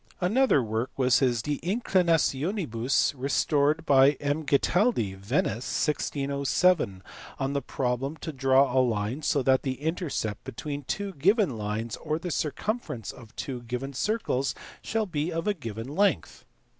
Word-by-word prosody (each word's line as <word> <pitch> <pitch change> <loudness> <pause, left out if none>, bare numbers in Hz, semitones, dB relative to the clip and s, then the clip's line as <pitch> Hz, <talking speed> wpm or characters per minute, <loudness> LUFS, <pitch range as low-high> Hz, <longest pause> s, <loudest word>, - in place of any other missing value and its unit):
Another 195 - +3
work 110 +3 -2
was 130 -2 +4
his 120 -5 +1
De 145 -1 -2
Inclinationibus 170 - +1
(restored 145 +3 +1
by 135 0 +6
M. 145 +2 -2
Ghetaldi, 145 - +2
Venice, 110 +6 -1
1607) 140 - +1 0.3
on 135 +1 -2
the 140 - 0
problem 130 +3 -2
to 160 - -5
draw 135 0 +3
a 130 - +6
line 115 +2 -1
so 145 -2 +1
that 130 0 +3
the 130 -2 -3
intercept 150 - -2
between 145 +2 -6
two 195 +5 -3
given 185 - +2
lines, 110 +1 -3
or 155 0 -2
the 175 +1 -5
circumferences 155 - -3
of 115 -2 -15
two 130 -3 -5
given 125 +4 -5
circles, 140 - -1 0.3
shall 225 -1 -1
be 165 -2 -2
of 165 +1 -3
a 210 - +3
given 115 - -6
length. 190 +2 0
140 Hz, 145 wpm, -27 LUFS, 125-165 Hz, 0.3 s, by